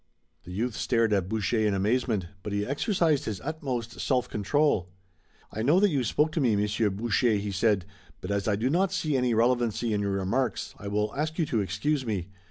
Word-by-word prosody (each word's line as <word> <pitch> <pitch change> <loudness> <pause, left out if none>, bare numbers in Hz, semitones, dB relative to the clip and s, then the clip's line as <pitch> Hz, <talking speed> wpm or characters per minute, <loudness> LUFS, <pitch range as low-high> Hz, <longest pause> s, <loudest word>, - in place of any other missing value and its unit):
The 90 - -9
youth 115 +6 -2
stared 115 -3 +1
at 95 -2 0
Boucher 110 0 0
in 105 -2 +2
amazement, 105 0 0 0.2
but 105 - -5
he 100 0 0
exercised 155 - +1
his 105 -4 -3
utmost 130 -7 -4
self 125 -2 +1
control. 105 - +1 0.6
"I 110 - -4
know 150 +10 +4
that 205 -1 +4
you 140 -4 +1
spoke 150 +7 +1
to 160 - -1
me, 120 -5 +3
Monsieur 105 +1 +1
Boucher," 115 +3 +1
he 100 0 -2
said, 100 -2 +1 0.3
"but 90 - -5
as 100 0 -1
I 105 - +2
do 120 +6 0
not 185 +3 +2
see 160 -6 -1
any 125 -3 +2
relevancy 120 -1 +1
in 105 - 0
your 100 -1 -1
remarks 105 +7 -1
I 100 - -7
will 105 +1 -1
ask 155 +2 -2
you 165 - +2
to 115 -7 0
excuse 105 - -1
me. 100 -6 -3
115 Hz, 205 wpm, -27 LUFS, 100-135 Hz, 0.6 s, know